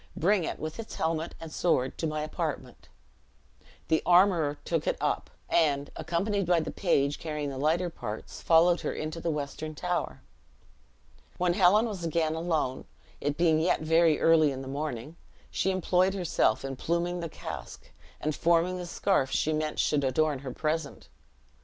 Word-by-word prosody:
Bring 190 +2 +2
it, - - -3
with 155 +6 -6
its 225 - -7
helmet 160 0 -2
and 165 -1 -8
sword, 135 -7 +1
to 165 - 0
my 155 0 -2
apartment." 155 - -5 1.0
The 160 - +2
armorer 175 -5 +4
took 165 -3 -1
it - - +1
up; - - -1 0.2
and, 145 -4 +1
accompanied 195 +2 -1
by 175 -1 +4
the 160 - -3
page 145 -6 +1
carrying 150 -3 -3
the 130 - -6
lighter 165 +5 +1
parts, 110 -8 -7
followed 170 +1 +4
her - - -2
into 155 +2 -5
the 170 - -1
western 150 +1 -4
tower. 180 +3 -3 1.1
When 180 -1 +2
Helen 195 +5 +5
was 205 -6 -5
again 160 -1 0
alone, 160 -6 -1 0.3
it 145 +1 -2
being 165 -2 +3
yet 165 +1 +1
very 160 0 +3
early 160 -3 +5
in 135 0 -5
the - - -9
morning, 145 +1 -5 0.3
she 190 - 0
employed 185 0 +2
herself 170 - +1
in 135 -1 -5
pluming 175 +3 -1
the 170 -1 -4
casque, 75 - -8 0.3
and 155 - -1
forming 170 +3 +2
the 175 - -5
scarf 170 -6 +1
she 155 +3 0
meant 155 0 -2
should 145 -2 +1
adorn 140 +2 +1
her 130 -1 -6
present. 155 +2 -3
160 Hz, 165 wpm, -28 LUFS, 150-175 Hz, 1.1 s, Helen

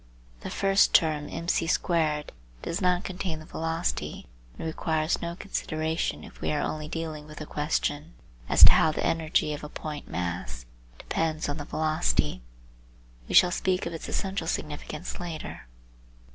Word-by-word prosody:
The - - -6
first 195 0 +4
term 155 -2 +4
mc^2 165 -2 +1 0.4
does 170 +5 -2
not 180 0 +3
contain 180 -3 -3
the 155 - -10
velocity, 160 - -2 0.3
and - - -5
requires 160 0 0
no 170 0 -3
consideration 160 -4 -2
if - - -13
we - - 0
are 150 - +1
only 155 +1 -2
dealing 155 -2 -4
with 155 0 -11
the 155 - -5
question 150 +1 -1 0.3
as - - +7
to - - +12
how 160 - +5
the - - -2
energy 160 -2 +1
of 150 - -6
a 150 - -6
point 150 -1 -6
mass; 85 -9 -4 0.3
depends 160 -1 -1
on 145 +1 -2
the 145 - -5
velocity. 150 - +1 0.9
We - - 0
shall 180 - +8
speak 185 +1 0
of 170 - -3
its 165 - -6
essential 190 -4 -2
significance 150 +1 -4
later. 165 - -6
155 Hz, 155 wpm, -28 LUFS, 150-170 Hz, 0.9 s, to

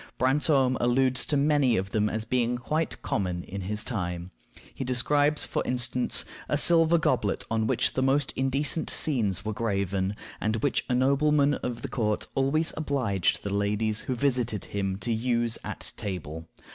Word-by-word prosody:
Brantome 130 -1 +2
alludes 130 +1 +2
to 145 - +1
many 140 -4 +3
of 95 +1 -3
them 105 -1 +1
as 110 +1 -3
being 120 0 0
quite 155 +7 -2
common 90 -3 -2
in 100 +1 -6
his 105 +3 -3
time. 90 -5 -4 0.4
He - - -5
describes, 145 +4 +2
for - - -2
instance, 125 0 +1 0.2
a - - +2
silver 170 0 +5
goblet 125 -10 0
on 110 -1 +1
which - - +1
the 130 - 0
most 135 +1 +1
indecent 135 +3 0
scenes 105 - +1
were 110 - -2
graven, 100 -3 -1 0.2
and 110 +1 0
which 130 +5 0
a 125 - +2
nobleman 140 +2 +3
of 125 -3 -4
the - - -2
court 105 -3 -1
always 140 +4 +1
obliged 130 - 0
the 100 - -3
ladies 105 +2 0
who 130 - -3
visited 120 -5 -1
him 95 -2 -3
to 110 +4 -2
use 115 0 0
at - - -6
table. 80 -5 -5
120 Hz, 165 wpm, -27 LUFS, 105-135 Hz, 0.4 s, silver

